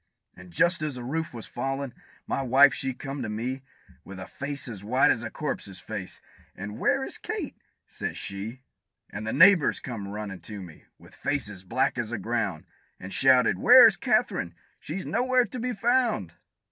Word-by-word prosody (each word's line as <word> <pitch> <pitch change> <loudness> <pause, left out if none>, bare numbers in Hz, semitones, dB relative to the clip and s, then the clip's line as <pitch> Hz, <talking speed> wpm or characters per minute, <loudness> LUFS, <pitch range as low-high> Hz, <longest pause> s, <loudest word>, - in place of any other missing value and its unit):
And 90 0 -13
just 170 - +2
as 150 -3 -2
the 125 - -6
roof 155 +5 -3
was 115 -2 -7
fallin', 135 +1 -4 0.3
my - - -2
wife 135 +1 +6
she 135 - -1
come 135 +2 -6
to 110 - -3
me, 125 +5 -3 0.4
With 95 -1 -10
a 95 - -6
face 140 -1 -4
as 105 -5 -7
white 125 +6 +3
as 115 - 0
a 115 - -5
corpse's 110 - -5
face, 105 -4 -6 0.4
and 105 +2 -7
"Where - - +2
is - - -4
Kate?" - - -4 0.3
says - - -5
she. 110 +7 -6 0.5
And 110 +2 -6
the - - -1
neighbors 175 - +6
come 115 -6 -6
runnin' 100 -2 -6
to 105 +5 -7
me, 85 -5 -12
with - - -18
faces 105 -10 -3
black 125 +6 0
as 115 -2 -2
the 120 - -3
ground, 100 -6 -2 0.3
And 95 +1 -8
shouted, 125 -7 +4
"Where - - +9
is - - +6
Katherine? 85 -2 0 0.2
She's 185 +5 -6
nowhere 255 0 +2
to 245 +4 -7
be 250 +2 -2
found!" 235 - +1
120 Hz, 185 wpm, -27 LUFS, 100-145 Hz, 0.5 s, Where